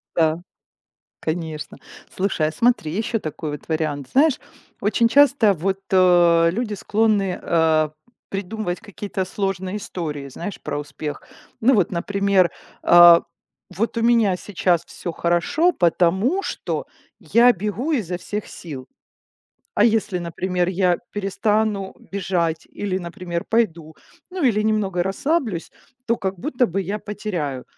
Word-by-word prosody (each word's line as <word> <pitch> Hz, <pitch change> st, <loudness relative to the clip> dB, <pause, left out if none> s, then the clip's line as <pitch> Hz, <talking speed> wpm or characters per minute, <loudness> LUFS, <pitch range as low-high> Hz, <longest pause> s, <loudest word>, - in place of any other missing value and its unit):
Да. 160 Hz, 0 st, +2 dB, 0.8 s
Конечно. 160 Hz, -2 st, -4 dB, 0.3 s
Слушай, 185 Hz, -5 st, 0 dB
а -, -, -7 dB
смотри, 175 Hz, -3 st, +1 dB
еще 225 Hz, +4 st, -1 dB
такой 155 Hz, -2 st, -5 dB
вот 145 Hz, +2 st, -8 dB
вариант. 155 Hz, -4 st, -2 dB
Знаешь, 285 Hz, +1 st, +3 dB, 0.4 s
очень 220 Hz, +3 st, +3 dB
часто 270 Hz, -4 st, +5 dB
вот, 190 Hz, +3 st, -2 dB
э, 175 Hz, -3 st, +5 dB
люди 215 Hz, +2 st, -2 dB
склонны, 205 Hz, -2 st, +1 dB
э, 160 Hz, -2 st, +2 dB, 0.4 s
придумывать 195 Hz, -1 st, -4 dB
какие-то 205 Hz, -2 st, -4 dB
сложные 190 Hz, 0 st, -3 dB
истории, 155 Hz, -9 st, -5 dB
знаешь, 170 Hz, +8 st, -7 dB
про -, -, -4 dB
успех. 145 Hz, +1 st, -6 dB, 0.4 s
Ну, 260 Hz, +3 st, +5 dB
вот, 195 Hz, -6 st, +2 dB
например, 195 Hz, 0 st, +2 dB, 0.3 s
а, 175 Hz, -1 st, +8 dB, 0.5 s
вот 225 Hz, +6 st, -1 dB
у -, -, +1 dB
меня 230 Hz, -5 st, +3 dB
сейчас 180 Hz, -4 st, 0 dB
всё 175 Hz, -, -6 dB
хорошо, 175 Hz, -, +1 dB
потому 190 Hz, -, +2 dB
что -, -, -4 dB, 0.3 s
я 245 Hz, +2 st, +5 dB
бегу 210 Hz, -, -3 dB
изо 190 Hz, -, -1 dB
всех 210 Hz, +3 st, -5 dB
сил. 135 Hz, -6 st, -9 dB, 0.9 s
А -, -, +4 dB
если, 215 Hz, -4 st, +2 dB
например, 175 Hz, +1 st, -2 dB
я 180 Hz, -1 st, +2 dB, 0.2 s
перестану 205 Hz, 0 st, 0 dB, 0.2 s
бежать 175 Hz, -4 st, -1 dB
или, 195 Hz, -2 st, -3 dB
например, 175 Hz, -1 st, -5 dB
пойду, 170 Hz, -9 st, 0 dB, 0.4 s
ну, 365 Hz, -1 st, -4 dB
или 215 Hz, -6 st, +3 dB
немного 205 Hz, -5 st, 0 dB
расслаблюсь, 210 Hz, -, -1 dB, 0.4 s
то 230 Hz, -, +2 dB
как 190 Hz, -3 st, -3 dB
будто 245 Hz, -, 0 dB
бы 195 Hz, -1 st, -2 dB
я 200 Hz, +3 st, -3 dB
потеряю. 175 Hz, -, -4 dB
190 Hz, 130 wpm, -22 LUFS, 170-215 Hz, 0.9 s, а